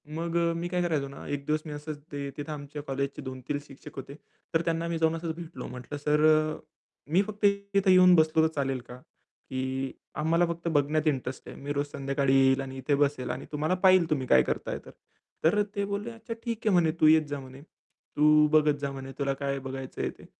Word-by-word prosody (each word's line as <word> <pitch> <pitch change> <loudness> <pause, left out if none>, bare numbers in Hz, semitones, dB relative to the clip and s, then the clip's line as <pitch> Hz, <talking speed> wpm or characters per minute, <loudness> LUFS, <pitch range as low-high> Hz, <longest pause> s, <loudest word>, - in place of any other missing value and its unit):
मग 170 +1 -3
अ, 170 0 +2
मी 175 +1 -3
काय 180 0 -1
करायचो 155 -5 0
ना, 140 - -10
एक 140 -1 -3
दिवस 155 0 +2
मी 150 - -6
असंच 150 0 -6
ते 140 -1 -4
तिथे 145 +1 -5
आमच्या 145 0 -6
कॉलेजचे 140 0 -3
2-3 130 +2 -4
शिक्षक 140 +2 -13
होते. 135 +1 -8 0.4
तर 165 - +3
त्यांना 165 0 0
मी 170 -1 -1
जाऊन 160 0 +2
असंच 165 -1 -4
भेटलो. 170 -1 -8
म्हटलं 125 +4 -7
"सर 150 +1 +1
अ, 155 0 +4 0.5
मी 185 +4 +5
फक्त 210 -1 -7 0.3
तिथे 195 -1 +4
येऊन 180 -1 +7
बसलो 160 0 +4
तर - - -8
चालेल 135 -2 -1
का? 125 +1 -10 0.5
की 130 0 -2 0.2
आम्हाला 165 +3 +2
फक्त 170 0 -4
बघण्यात 155 0 +1
इंटरेस्ट 130 -3 -2
आहे. - - -9
मी 145 +1 -3
रोज 145 0 0
संध्याकाळी 135 0 0
येईल 135 0 +4
आणि 135 0 -7
इथे 140 +2 +1
बसेल 140 -2 0
आणि - - -5
तुम्हाला 155 +4 0
पाहील 185 -3 +6
तुम्ही 135 -4 0
काय 65 -1 +6
करताय - - -3
तर." - - -11 0.5
तर 210 +6 +4
ते 200 0 0
बोलले, 205 +3 -3
"अच्छा 230 +1 -7
ठीक 230 -2 -2
आहे." 210 - +4
म्हणे. 165 -3 +4
"तू 155 - +7
येत 155 0 +6
जा." 145 - -3
म्हणे. 130 +1 -11
"तू 150 -1 +1
बघत 150 -1 +4
जा." 140 -1 -2
म्हणे 135 0 -7
"तुला 140 -1 +1
काय 140 0 -1
बघायचंय 135 0 -4
ते." - - -13
150 Hz, 215 wpm, -28 LUFS, 140-165 Hz, 0.5 s, येऊन